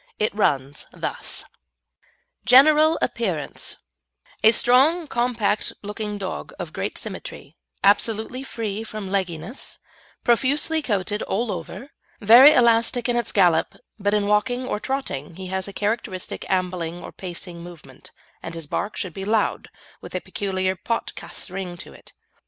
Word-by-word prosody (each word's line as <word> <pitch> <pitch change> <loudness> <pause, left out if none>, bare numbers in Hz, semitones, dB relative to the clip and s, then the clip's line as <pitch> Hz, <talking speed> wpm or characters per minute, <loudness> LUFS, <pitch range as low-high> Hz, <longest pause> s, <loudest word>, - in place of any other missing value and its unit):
It 215 - 0
runs 140 -8 0
thus: - - -5 1.0
GENERAL 310 +5 +6
APPEARANCE 185 -11 -2 0.7
A 220 - +9
strong, 275 +9 +4
compact 235 -6 0
looking 210 0 -4
dog 190 -2 -5
of - - -6
great - - -3
symmetry, - - -7 0.3
absolutely 220 +4 +2
free 220 -5 -4
from 215 -3 -6
legginess, 185 - -2 0.5
profusely 285 +6 +2
coated 210 -5 -1
all 225 +2 -1
over, 185 - -7 0.3
very 235 +7 +9
elastic 235 -1 +3
in 245 - +1
its 240 - 0
gallop, 175 -5 +3 0.2
but 205 +1 +1
in 205 -1 +1
walking 245 +5 +1
or 230 - -2
trotting 210 - -4
he 190 +1 -7
has 190 0 -2
a - - -6
characteristic 205 -2 -3
ambling 180 -2 -1
or - - -8
pacing 175 -1 -6
movement, 165 -7 -12 0.3
and 165 - -7
his 165 -2 -5
bark 205 +8 -3
should 185 -5 -3
be 195 - -6
loud, 215 +1 0 0.3
with - - -8
a - - +1
peculiar 190 -2 -2
pot 230 +5 -3
casse - - -6
ring 185 -2 -6
in - - -13
it. - - -14
210 Hz, 140 wpm, -23 LUFS, 185-240 Hz, 1.0 s, A